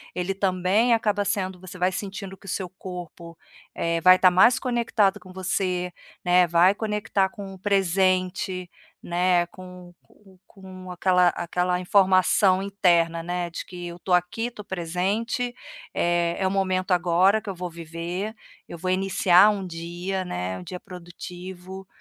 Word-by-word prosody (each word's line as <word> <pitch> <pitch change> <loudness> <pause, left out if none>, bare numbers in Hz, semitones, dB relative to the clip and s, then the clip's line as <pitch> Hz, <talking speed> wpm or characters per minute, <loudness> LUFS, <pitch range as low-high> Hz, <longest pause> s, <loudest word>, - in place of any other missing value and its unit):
ele 180 +2 -1
também 195 +4 +2
acaba 210 -2 +1
sendo 190 -2 -2
você 185 0 -10
vai 180 +1 +1
sentindo 195 0 -6
que - - -20
o - - -6
seu 185 +1 -3
corpo, 175 -2 -9 0.4
eh, 170 0 -1
vai 185 +2 +8
estar 185 0 +5
mais 190 +7 +5
conectado 235 -5 +1
com 185 - -14
você, 180 -1 -2 0.3
né, 180 0 +5
vai 175 +3 +5
conectar 210 -2 -1
com 195 0 -9
o 190 - -13
presente, 185 -1 0 0.3
né, 175 0 +2
com 180 0 -12
com 190 -3 -23
com 185 -1 -11
aquela 180 0 +3
aquela 180 +1 -1
informação 185 0 +3
interna, 170 -4 +2
né, 175 +1 -3
de - - -5
que: 175 -1 -8
"Eu 170 0 -8
estou 180 0 +1
aqui, 180 +6 -1
estou 215 -4 -10
presente, 195 +8 -2 0.4
eh, 175 0 +1
é 190 - +1
o - - +1
momento 185 -1 0
agora 180 +4 +3
que 215 - -9
eu 195 - -4
vou 180 0 -5
viver. 170 +5 -5 0.3
Eu 170 - -8
vou 185 +2 -3
iniciar 190 +1 +5
um 200 -2 -4
dia, 175 +3 -4
né, 95 - -4
um 90 - -9
dia 180 - -7
produtivo", 180 +1 -10
185 Hz, 160 wpm, -24 LUFS, 175-195 Hz, 0.4 s, vai